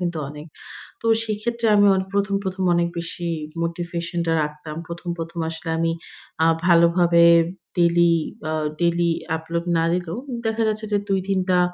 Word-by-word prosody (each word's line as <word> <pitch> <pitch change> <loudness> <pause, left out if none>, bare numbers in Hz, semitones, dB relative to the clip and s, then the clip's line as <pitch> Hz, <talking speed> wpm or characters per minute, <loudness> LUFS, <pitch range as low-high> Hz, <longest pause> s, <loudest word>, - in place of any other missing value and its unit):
কিন্তু 175 -2 -2
অনেক। 150 +2 -9 0.6
তো - - -9 0.2
সেক্ষেত্রে 225 +2 -2
আমি 205 0 +5
অনেক 190 0 -2
প্রথম, 200 0 +1
প্রথম 190 0 -3
অনেক 170 0 +2
বেশি 170 0 -4 0.3
মোটিভেশনটা 170 0 -3
রাখতাম। 150 +1 -6
প্রথম, 170 +1 -6
প্রথম 165 +1 -5
আসলে 165 0 -7
আমি, 165 0 +1 0.5
আ - - +5 0.2
ভালোভাবে 170 0 +5 0.5
ডেইলি, 170 0 +4 0.4
আ - - -1 0.3
ডেইলি 170 0 +2 0.3
আপলোড 170 +1 -4
না 165 - +2
দিলেও 175 -1 -2 0.3
দেখা 225 0 0
যাচ্ছে 215 0 -2
যে - - +4
২-৩ 195 0 0
টা 180 -1 +4
170 Hz, 150 wpm, -22 LUFS, 170-190 Hz, 0.6 s, আমি